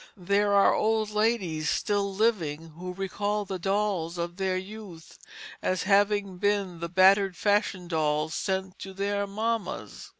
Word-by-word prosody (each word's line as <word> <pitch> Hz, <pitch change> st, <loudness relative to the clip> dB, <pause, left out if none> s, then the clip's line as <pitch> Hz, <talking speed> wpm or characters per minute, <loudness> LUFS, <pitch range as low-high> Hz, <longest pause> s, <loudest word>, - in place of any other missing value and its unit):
There 200 Hz, +3 st, +1 dB
are 200 Hz, 0 st, +5 dB
old 215 Hz, -1 st, +1 dB
ladies 210 Hz, -8 st, 0 dB
still 200 Hz, -1 st, 0 dB
living 175 Hz, -7 st, 0 dB
who 180 Hz, +3 st, -8 dB
recall 205 Hz, +2 st, -2 dB
the 190 Hz, -1 st, -5 dB
dolls 195 Hz, -3 st, -1 dB
of 170 Hz, +1 st, -4 dB
their 190 Hz, -1 st, 0 dB
youth 190 Hz, -4 st, -10 dB, 0.4 s
as 185 Hz, -1 st, 0 dB
having 200 Hz, -1 st, +2 dB
been 200 Hz, -4 st, 0 dB
the 170 Hz, 0 st, -4 dB
battered 190 Hz, +1 st, +4 dB
fashion 205 Hz, -2 st, +1 dB
dolls 155 Hz, -1 st, 0 dB
sent 190 Hz, -1 st, -3 dB
to 195 Hz, -, -8 dB
their 200 Hz, +1 st, -1 dB
mammas. 215 Hz, -1 st, -3 dB
195 Hz, 140 wpm, -27 LUFS, 175-205 Hz, 0.4 s, are